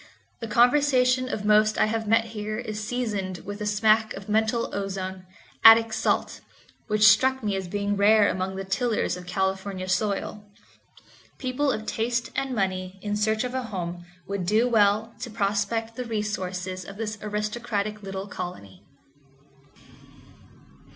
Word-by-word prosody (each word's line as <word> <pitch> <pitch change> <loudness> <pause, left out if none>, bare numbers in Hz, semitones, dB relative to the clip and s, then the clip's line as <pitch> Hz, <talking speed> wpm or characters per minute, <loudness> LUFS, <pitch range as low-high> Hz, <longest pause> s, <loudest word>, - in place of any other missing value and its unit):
The 230 - -5
conversation 255 +2 +3
of 210 -4 -4
most 215 0 +4
I - - +4
have 220 0 -2
met 225 +1 +3
here 215 0 -4
is 215 -3 -5
seasoned 210 -6 -3
with 205 +1 -6
a 210 - -2
smack 215 +1 +2
of 195 0 -9
mental 220 +2 0
ozone, 190 -2 -4 0.4
Attic 225 0 +8
salt, - - -1 0.5
which 215 -1 +4
struck 260 +4 +4
me 205 -2 0
as 190 -1 -3
being 205 +2 -1
rare 205 +1 +5
among 190 +1 -2
the 195 - -4
tillers 220 +3 0
of 180 0 -10
California 190 0 -2
soil. 205 +2 -1 0.9
People 270 +2 0
of 215 -3 -4
taste 235 +2 -1
and 270 -2 -2
money 185 -2 -2
in 205 0 -1
search 215 +2 +1
of 250 0 -4
a 260 - -1
home 175 -6 -5 0.2
would 195 -3 -3
do 220 +5 +3
well 220 0 +2
to - - -5
prospect 215 +2 -1
the 250 - -4
resources 185 -4 -3
of 195 +2 -10
this 215 -2 -4
aristocratic 210 0 -3
little 195 -1 -5
colony. 100 - -8
210 Hz, 150 wpm, -25 LUFS, 195-225 Hz, 0.9 s, Attic